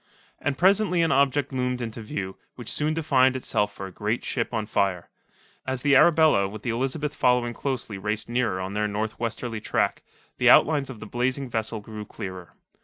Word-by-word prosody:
And 145 Hz, -2 st, -2 dB
presently 190 Hz, -2 st, +3 dB
an 165 Hz, -, +2 dB
object 140 Hz, 0 st, +2 dB
loomed 125 Hz, -1 st, -1 dB
into 115 Hz, -1 st, -5 dB
view, 95 Hz, -3 st, -5 dB, 0.2 s
which 120 Hz, -3 st, -6 dB
soon 155 Hz, +1 st, 0 dB
defined 130 Hz, -5 st, +3 dB
itself 105 Hz, -5 st, 0 dB
for 95 Hz, -, -8 dB
a 95 Hz, -, -8 dB
great 105 Hz, +5 st, -2 dB
ship 115 Hz, -3 st, -2 dB
on 110 Hz, -3 st, -2 dB
fire. 95 Hz, -4 st, -1 dB, 0.6 s
As 130 Hz, -1 st, -2 dB
the 140 Hz, -1 st, +4 dB
Arabella 155 Hz, -9 st, +5 dB
with 105 Hz, +2 st, -9 dB
the 120 Hz, -, -1 dB
Elizabeth 135 Hz, +5 st, -2 dB
following 125 Hz, -3 st, +2 dB
closely 120 Hz, -7 st, -4 dB
raced 105 Hz, +2 st, -2 dB
nearer 120 Hz, -5 st, 0 dB
on 95 Hz, +1 st, -4 dB
their 105 Hz, 0 st, 0 dB
north 105 Hz, +1 st, -3 dB
westerly 115 Hz, -1 st, -3 dB
tack, -, -, 0 dB, 0.4 s
the -, -, +5 dB
outlines 145 Hz, -3 st, +5 dB
of 120 Hz, -5 st, -9 dB
the -, -, -6 dB
blazing 125 Hz, +3 st, -2 dB
vessel 110 Hz, -1 st, -2 dB
grew 105 Hz, 0 st, -8 dB
clearer. 90 Hz, -3 st, -8 dB
120 Hz, 185 wpm, -25 LUFS, 105-135 Hz, 0.6 s, Arabella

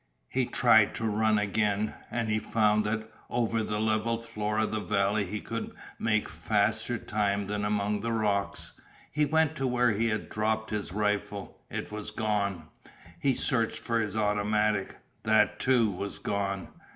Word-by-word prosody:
He -, -, 0 dB
tried -, -, +5 dB
to 115 Hz, -, -3 dB
run 110 Hz, 0 st, +2 dB
again, 105 Hz, +1 st, +1 dB, 0.2 s
and 115 Hz, -2 st, -1 dB
he 110 Hz, 0 st, +1 dB
found 105 Hz, -1 st, +2 dB
that 110 Hz, +1 st, -1 dB, 0.2 s
over 115 Hz, -2 st, 0 dB
the 105 Hz, -1 st, -2 dB
level 110 Hz, +1 st, +1 dB
floor 105 Hz, -2 st, -3 dB
of 110 Hz, 0 st, +1 dB
the 110 Hz, -, -1 dB
valley 100 Hz, -1 st, +1 dB
he 105 Hz, +3 st, -3 dB
could 115 Hz, +1 st, -5 dB, 0.3 s
make 110 Hz, -1 st, +1 dB
faster 110 Hz, +3 st, 0 dB
time 100 Hz, -2 st, 0 dB
than 105 Hz, +1 st, -2 dB
among 105 Hz, 0 st, 0 dB
the 115 Hz, +1 st, -2 dB
rocks. 105 Hz, -3 st, -1 dB, 0.4 s
He 150 Hz, 0 st, +2 dB
went 160 Hz, +1 st, +2 dB
to 135 Hz, -, 0 dB
where 125 Hz, -1 st, +3 dB
he 110 Hz, +3 st, +1 dB
had 110 Hz, -1 st, -1 dB
dropped 110 Hz, +1 st, -1 dB
his 105 Hz, -5 st, -2 dB
rifle. 105 Hz, 0 st, -2 dB
It -, -, -5 dB
was 105 Hz, 0 st, -4 dB
gone. 100 Hz, -6 st, -1 dB, 0.5 s
He 135 Hz, +7 st, +2 dB
searched 115 Hz, -4 st, +1 dB
for 115 Hz, 0 st, -1 dB
his 105 Hz, -1 st, -2 dB
automatic. 105 Hz, -1 st, +1 dB, 0.2 s
That, 110 Hz, -1 st, +3 dB
too, 120 Hz, -5 st, +3 dB
was 100 Hz, +2 st, -4 dB
gone. 100 Hz, -2 st, -2 dB
105 Hz, 165 wpm, -29 LUFS, 105-115 Hz, 0.5 s, tried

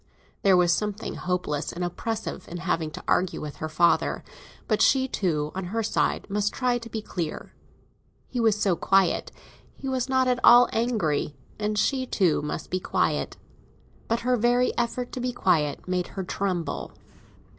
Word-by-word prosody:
There 195 Hz, -2 st, +5 dB
was 175 Hz, -1 st, +4 dB
something 210 Hz, +1 st, -2 dB
hopeless 175 Hz, -5 st, -2 dB
and 180 Hz, -, -4 dB
oppressive 215 Hz, +3 st, -4 dB
in 175 Hz, -, -6 dB
having 165 Hz, -2 st, -1 dB
to -, -, -9 dB
argue 185 Hz, 0 st, +1 dB
with 150 Hz, -1 st, -7 dB
her 155 Hz, -, -4 dB
father; 170 Hz, +2 st, +2 dB, 0.4 s
but 215 Hz, -1 st, +1 dB
she 265 Hz, -1 st, +4 dB
too, 155 Hz, -, -1 dB
on 190 Hz, 0 st, -4 dB
her 225 Hz, +5 st, -2 dB
side, 215 Hz, -, 0 dB
must 205 Hz, 0 st, 0 dB
try 250 Hz, -2 st, 0 dB
to 230 Hz, 0 st, -10 dB
be 220 Hz, -1 st, -4 dB
clear. 170 Hz, -7 st, -5 dB, 0.7 s
He 250 Hz, -, -4 dB
was 220 Hz, -3 st, +3 dB
so 195 Hz, -4 st, +2 dB
quiet; 195 Hz, +1 st, +2 dB, 0.4 s
he 270 Hz, -, -7 dB
was 260 Hz, -1 st, -1 dB
not 260 Hz, -1 st, +3 dB
at 250 Hz, -1 st, +2 dB
all 245 Hz, 0 st, +8 dB
angry; 195 Hz, -12 st, 0 dB, 0.2 s
and 210 Hz, 0 st, -1 dB
she 260 Hz, +4 st, +1 dB
too 180 Hz, -11 st, +2 dB
must 150 Hz, +1 st, -5 dB
be 185 Hz, -, 0 dB
quiet. -, -, -1 dB, 0.7 s
But 230 Hz, +1 st, 0 dB
her 250 Hz, +1 st, +2 dB
very 245 Hz, +2 st, +2 dB
effort 240 Hz, +1 st, -2 dB
to -, -, -5 dB
be 250 Hz, 0 st, -1 dB
quiet 155 Hz, -, +1 dB
made 180 Hz, -1 st, -1 dB
her 190 Hz, -, -1 dB
tremble. 180 Hz, -2 st, -3 dB
200 Hz, 170 wpm, -26 LUFS, 175-240 Hz, 0.7 s, all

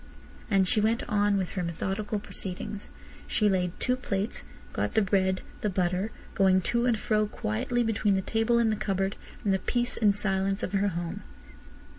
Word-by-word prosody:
And 195 Hz, -3 st, +3 dB
she 210 Hz, -, +4 dB
went 225 Hz, +2 st, +1 dB
on 205 Hz, -1 st, +2 dB
with 185 Hz, -2 st, -1 dB
her 185 Hz, -, -3 dB
methodical 190 Hz, +5 st, -2 dB
proceedings. 200 Hz, 0 st, -5 dB, 0.4 s
She 210 Hz, -, +2 dB
laid 180 Hz, -3 st, 0 dB
two 250 Hz, -, +2 dB
plates, 210 Hz, -4 st, -2 dB, 0.3 s
got -, -, -2 dB
the 220 Hz, -, +5 dB
bread, 190 Hz, -1 st, +1 dB, 0.2 s
the 210 Hz, -, +1 dB
butter, 185 Hz, +2 st, 0 dB, 0.2 s
going 190 Hz, -1 st, +4 dB
to 235 Hz, +1 st, +2 dB
and 235 Hz, -3 st, +3 dB
fro 215 Hz, 0 st, +1 dB
quietly 210 Hz, -, -1 dB
between 215 Hz, -3 st, +2 dB
the 190 Hz, -, +1 dB
table 225 Hz, +3 st, +2 dB
and 230 Hz, -2 st, +3 dB
the -, -, +1 dB
cupboard 195 Hz, -1 st, 0 dB, 0.3 s
in 200 Hz, -, +3 dB
the 190 Hz, -, +2 dB
peace 240 Hz, +3 st, 0 dB
and 205 Hz, -3 st, +4 dB
silence 195 Hz, -1 st, 0 dB
of 185 Hz, -, -3 dB
her 200 Hz, +1 st, +2 dB
home. 170 Hz, -2 st, -3 dB
200 Hz, 180 wpm, -28 LUFS, 190-215 Hz, 0.4 s, the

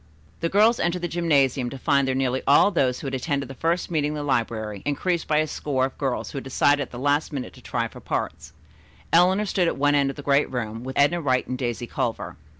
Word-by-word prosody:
The 165 Hz, -, -1 dB
girls 220 Hz, +5 st, +4 dB
entered 175 Hz, +1 st, -1 dB
the -, -, +1 dB
gymnasium 140 Hz, -7 st, +1 dB
to 135 Hz, -, -7 dB
find 140 Hz, 0 st, +2 dB
there 130 Hz, -, 0 dB
nearly 130 Hz, -1 st, 0 dB
all 145 Hz, +7 st, +6 dB
of -, -, -9 dB
those 130 Hz, -6 st, +1 dB
who -, -, -8 dB
had 135 Hz, -, -4 dB
attended 140 Hz, +1 st, -2 dB
the 135 Hz, -, -8 dB
first 170 Hz, +6 st, -1 dB
meeting 150 Hz, -2 st, 0 dB
in -, -, -5 dB
the 150 Hz, -, -4 dB
library 110 Hz, -6 st, -2 dB
increased 165 Hz, +4 st, -1 dB
by 155 Hz, -, +1 dB
about 155 Hz, -, +4 dB
a -, -, -5 dB
score 135 Hz, -3 st, -1 dB
of 135 Hz, -, -7 dB
girls 135 Hz, -3 st, -2 dB
who -, -, -7 dB
had -, -, -10 dB
decided 145 Hz, +2 st, +2 dB
at 135 Hz, -, -4 dB
the 120 Hz, -, -9 dB
last 145 Hz, +4 st, 0 dB
minute 135 Hz, -4 st, -5 dB
to -, -, -15 dB
try -, -, -2 dB
for -, -, -13 dB
parts. 80 Hz, +1 st, -4 dB, 0.6 s
Eleanor 185 Hz, +5 st, +4 dB
stood 185 Hz, -3 st, +1 dB
at -, -, -1 dB
one 145 Hz, +1 st, +3 dB
end 140 Hz, -1 st, +3 dB
of 135 Hz, -, -5 dB
the 145 Hz, -, -9 dB
great 140 Hz, +1 st, +2 dB
room, 115 Hz, -2 st, -4 dB
with 130 Hz, +1 st, -6 dB
Edna 170 Hz, +5 st, +3 dB
Wright 130 Hz, -4 st, +1 dB
and 130 Hz, -, -4 dB
Daisy 120 Hz, -2 st, -3 dB
Culver. 115 Hz, -1 st, -3 dB
140 Hz, 255 wpm, -24 LUFS, 130-160 Hz, 0.6 s, all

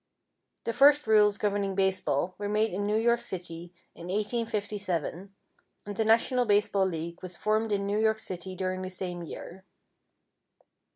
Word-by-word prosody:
The 230 Hz, -, -2 dB
first 290 Hz, +4 st, +6 dB
rules 210 Hz, -2 st, +5 dB
governing 200 Hz, -2 st, -1 dB
baseball 185 Hz, -4 st, 0 dB
were 205 Hz, 0 st, -3 dB
made 215 Hz, 0 st, +1 dB
in 205 Hz, +2 st, -1 dB
New 210 Hz, -, +1 dB
York 235 Hz, +1 st, +3 dB
City, 175 Hz, -1 st, -7 dB, 0.2 s
in 170 Hz, -, -10 dB
1857, 205 Hz, -4 st, -2 dB, 0.5 s
and 205 Hz, 0 st, -6 dB
the 220 Hz, -, +1 dB
National 235 Hz, +3 st, +3 dB
Baseball 205 Hz, -2 st, +2 dB
League 170 Hz, -1 st, -5 dB
was 180 Hz, -1 st, -7 dB
formed 215 Hz, +1 st, 0 dB
in 200 Hz, -1 st, 0 dB
New 205 Hz, +1 st, 0 dB
York 220 Hz, 0 st, +3 dB
City 185 Hz, -2 st, -7 dB
during 185 Hz, 0 st, -2 dB
the 185 Hz, -, -4 dB
same 180 Hz, -1 st, -5 dB
year. 175 Hz, +2 st, -9 dB
200 Hz, 155 wpm, -28 LUFS, 185-215 Hz, 0.5 s, first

